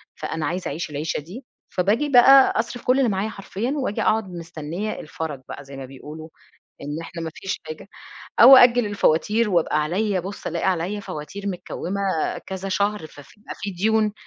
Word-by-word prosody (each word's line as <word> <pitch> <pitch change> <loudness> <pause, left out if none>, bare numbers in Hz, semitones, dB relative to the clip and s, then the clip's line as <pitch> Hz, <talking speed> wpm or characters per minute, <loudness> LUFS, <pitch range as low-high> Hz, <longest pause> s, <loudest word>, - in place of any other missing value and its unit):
فأنا 160 -2 -4
عايزة 180 +4 -3
أعيش 160 0 -4
العيشة 150 +2 -3
دي، 195 - -10 0.2
فباجي 215 +11 +1
بقى 270 +1 +7
أصرف 240 +1 -3
كل 255 +2 +3
اللي 250 -4 +3
معايا 200 +2 -1
حرفيًا، 210 +4 -4
وآجي 255 -7 -2
أقعد 215 -3 +1
مستنية 170 +4 -5
الفَرَج 155 -3 -6
بقى 140 - -7
زي 135 0 -11
ما 135 - -6
بيقولوا 150 +4 -10 0.5
إن 145 +3 -5
إحنا 165 0 -7
ما 160 -1 -4
فيش 190 -1 -4
حاجة، 155 +5 -8 0.5
أو 260 +3 +11
أأجّل 245 -2 +6
الفواتير 205 +3 +1
وابقى 160 -3 +2
عليّا، 190 +4 0
بُص 195 +3 -8
ألاقي 170 +3 -2
عليّا 185 +4 -2
فواتير 195 +5 -6
مكْوُمَة 190 +1 -4 0.5
كذا 190 0 -5
شهر 200 -2 -1
ف 145 - -14
في 145 +8 -19
بيبقى - - -8
فيه 200 -3 -4
ديون، 215 +2 +2
190 Hz, 175 wpm, -23 LUFS, 160-215 Hz, 0.5 s, أو